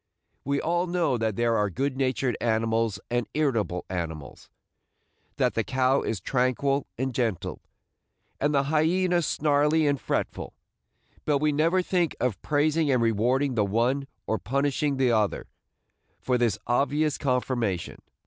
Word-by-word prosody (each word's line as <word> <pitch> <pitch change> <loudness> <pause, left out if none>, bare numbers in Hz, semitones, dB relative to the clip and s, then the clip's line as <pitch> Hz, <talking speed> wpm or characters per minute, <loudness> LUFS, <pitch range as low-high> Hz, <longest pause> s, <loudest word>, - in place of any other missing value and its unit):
We 140 +1 0
all 175 +2 0
know 175 -6 +1
that 110 -2 -1
there 120 0 +1
are 105 -2 +1
good 130 +7 -2
natured 130 -2 0
animals 115 -2 0
and 120 -2 -1
irritable 115 - 0
animals, 80 -6 -6 0.4
– - - -44
that - - +2
the 115 - 0
cow 130 +2 +2
is 110 - -2
tranquil 130 +5 0
and 130 +1 -2
gentle, 115 -7 -2 0.8
and 145 - +1
the 140 -2 +2
hyena 175 +5 +2
snarly 150 +1 +2
and 140 -4 +1
fretful; - - -3 0.7
but 150 -2 +2
we 150 +2 +1
never 165 +5 +2
think 175 -3 0
of 120 -8 -1
praising 155 +1 +1
and 130 -2 +3
rewarding 125 +5 +1
the 110 -3 +2
one, 120 +7 0 0.2
or 110 - -1
punishing 140 +2 0
the 130 -2 +3
other, 110 -3 0 0.7
for 125 - 0
this 120 -5 +1
obvious 145 +5 +1
conformation. 125 - -1
130 Hz, 145 wpm, -26 LUFS, 115-145 Hz, 0.8 s, and